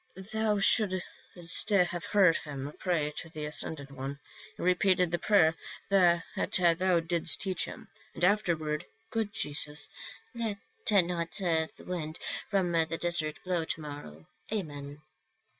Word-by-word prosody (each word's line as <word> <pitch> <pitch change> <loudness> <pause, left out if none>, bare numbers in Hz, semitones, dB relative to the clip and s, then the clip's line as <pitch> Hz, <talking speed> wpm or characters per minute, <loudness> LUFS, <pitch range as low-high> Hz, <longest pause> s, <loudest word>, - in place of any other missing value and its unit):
"Thou 220 -1 +1
shouldst 185 -3 +1
have 175 -4 +2
heard 190 -6 +4
him 145 -1 -6
pray 165 -5 0
to 165 - -6
the 155 -2 -5
ascended 150 -2 -3
One; 140 +1 -6 0.4
he - - -6
repeated 180 -1 +3
the 175 - 0
prayer 165 -7 +4 0.4
that 175 -3 +5
thou 180 -1 +3
didst 165 0 +4
teach 190 -3 -1
him, - - -10 0.3
and 175 - +1
afterward, 170 -6 +1 0.2
' - - -37
Good 220 -2 -1
Jesus, 150 -5 -4 0.5
let 225 -4 -2 0.3
not 175 -4 +2
the 165 -5 0
wind 160 -3 -5 0.3
from 190 -4 +1
the 165 -1 +1
desert 155 -3 0
blow 180 -2 0
to 160 - -3
morrow. 110 - -9 0.2
Amen.' 145 -7 -5
170 Hz, 135 wpm, -30 LUFS, 155-185 Hz, 0.5 s, that